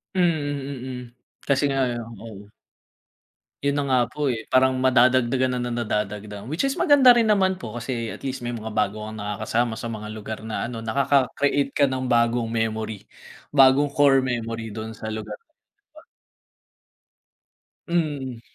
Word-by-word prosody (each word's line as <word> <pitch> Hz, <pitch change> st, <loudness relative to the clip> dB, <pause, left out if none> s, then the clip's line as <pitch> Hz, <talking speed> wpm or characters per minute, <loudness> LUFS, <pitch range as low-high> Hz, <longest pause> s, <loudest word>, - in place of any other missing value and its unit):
Mm, 180 Hz, -2 st, +4 dB, 0.6 s
mm. 130 Hz, -1 st, -5 dB, 0.5 s
Kasi 140 Hz, 0 st, +2 dB
nga 135 Hz, -1 st, +1 dB, 0.3 s
oo. 105 Hz, -2 st, -11 dB, 1.1 s
Yun 140 Hz, 0 st, +1 dB
na 145 Hz, -, +1 dB
nga 130 Hz, -2 st, +3 dB
po, 150 Hz, +3 st, -3 dB
eh, 115 Hz, -5 st, -2 dB
parang 130 Hz, 0 st, +4 dB
madadagdagan 130 Hz, 0 st, +3 dB
na 120 Hz, -, -2 dB
nadadagdagan. 105 Hz, -2 st, -3 dB
Which 160 Hz, -, -1 dB
is 275 Hz, -, +1 dB
maganda 285 Hz, -7 st, +6 dB
rin 230 Hz, -2 st, +2 dB
naman 190 Hz, -3 st, +2 dB
po 115 Hz, 0 st, -6 dB
kasi 115 Hz, -1 st, -3 dB
at -, -, -9 dB
least 135 Hz, -1 st, -3 dB
may 120 Hz, -, -4 dB
mga 110 Hz, 0 st, -7 dB
bago 105 Hz, +1 st, -1 dB
kang 110 Hz, 0 st, -7 dB
nakakasama 110 Hz, +3 st, -1 dB
sa 110 Hz, -, -6 dB
mga 110 Hz, -2 st, -5 dB
lugar 110 Hz, +1 st, -6 dB
na 110 Hz, +1 st, -3 dB
ano, 115 Hz, -1 st, -6 dB
nakaka-create 140 Hz, +3 st, +1 dB
ka 140 Hz, +1 st, +2 dB
ng 130 Hz, -1 st, -2 dB
bagong 115 Hz, -1 st, +2 dB
memory, 110 Hz, -2 st, -2 dB, 0.5 s
bagong 135 Hz, +1 st, +5 dB
core 135 Hz, -2 st, +4 dB
memory 115 Hz, -3 st, -3 dB
dun 110 Hz, 0 st, -7 dB
sa 110 Hz, -1 st, -5 dB
lugar. 105 Hz, -1 st, -6 dB, 2.5 s
Mm. 145 Hz, -8 st, -2 dB
120 Hz, 145 wpm, -24 LUFS, 110-135 Hz, 2.5 s, maganda